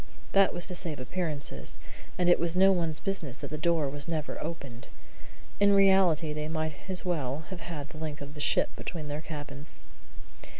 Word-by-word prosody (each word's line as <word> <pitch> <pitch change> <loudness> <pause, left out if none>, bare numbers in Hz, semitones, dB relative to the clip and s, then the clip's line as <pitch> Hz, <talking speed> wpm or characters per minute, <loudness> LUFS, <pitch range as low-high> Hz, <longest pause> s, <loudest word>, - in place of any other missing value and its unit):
That 195 -1 +5
was 175 - +4
to 185 - -2
save 170 -5 +2
appearances, 145 - -1 0.4
and 180 - +2
it 175 - +6
was 170 0 -1
no 190 +1 +6
one's 165 -4 0
business 170 - -1
that - - -7
the - - -2
door 165 -2 +2
was 145 +2 -4
never 155 -3 -3
opened. 140 -7 -7 0.7
In 200 0 +5
reality, 190 -6 +4
they 150 0 -3
might 155 -1 -2 0.2
as 185 0 0
well 150 -4 -1
have 180 -2 -6
had 155 -4 -6
the 155 - -10
length 155 -2 -5
of 145 +1 -9
the 150 - -10
ship - - +2
between 155 -4 -6
their 145 +1 -3
cabins. 150 -1 -7
160 Hz, 185 wpm, -29 LUFS, 150-175 Hz, 0.7 s, it